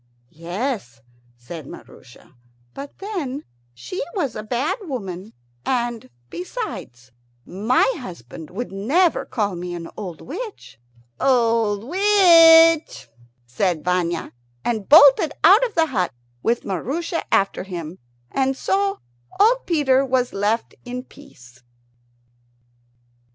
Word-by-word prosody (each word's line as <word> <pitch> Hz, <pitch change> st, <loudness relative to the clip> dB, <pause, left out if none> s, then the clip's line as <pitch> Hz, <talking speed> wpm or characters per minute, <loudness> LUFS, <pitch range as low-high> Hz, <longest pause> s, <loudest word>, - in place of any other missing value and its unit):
"Yes," 175 Hz, -, -4 dB, 0.4 s
said 140 Hz, +5 st, -9 dB
Maroosia, 125 Hz, -, -14 dB, 0.4 s
"but 280 Hz, 0 st, -9 dB
then 325 Hz, -10 st, -5 dB, 0.3 s
she 365 Hz, -, -6 dB
was 285 Hz, -, -2 dB
a -, -, -4 dB
bad 245 Hz, -, -2 dB
woman; 210 Hz, -, -6 dB, 0.3 s
and 240 Hz, -, -2 dB, 0.2 s
besides, 185 Hz, -, -7 dB, 0.3 s
my 215 Hz, +7 st, +1 dB
husband 160 Hz, -, -10 dB
would 230 Hz, +5 st, -6 dB
never 285 Hz, -, +1 dB
call 205 Hz, -4 st, -2 dB
me 175 Hz, 0 st, -5 dB
an 165 Hz, -1 st, -7 dB
old 180 Hz, -7 st, -7 dB
witch." 390 Hz, -, -8 dB, 0.4 s
"Old 230 Hz, -5 st, +2 dB
witch!" 330 Hz, -, +5 dB, 0.4 s
said 155 Hz, +7 st, -1 dB
Vanya, 175 Hz, -2 st, -1 dB, 0.3 s
and 220 Hz, -4 st, -2 dB
bolted 290 Hz, 0 st, +7 dB
out 395 Hz, +8 st, +7 dB
of 450 Hz, -, -17 dB
the 325 Hz, -2 st, +4 dB
hut 200 Hz, -, -1 dB, 0.3 s
with 235 Hz, +1 st, 0 dB
Maroosia 280 Hz, -, -3 dB
after 195 Hz, 0 st, +1 dB
him; 175 Hz, -2 st, -7 dB, 0.3 s
and 270 Hz, 0 st, 0 dB
so 195 Hz, -1 st, -1 dB, 0.4 s
old 475 Hz, +5 st, +3 dB
Peter 275 Hz, -6 st, +3 dB
was 255 Hz, -2 st, 0 dB
left 210 Hz, +3 st, -1 dB
in 250 Hz, 0 st, -6 dB
peace. 130 Hz, -, -18 dB
235 Hz, 110 wpm, -21 LUFS, 180-300 Hz, 0.4 s, bolted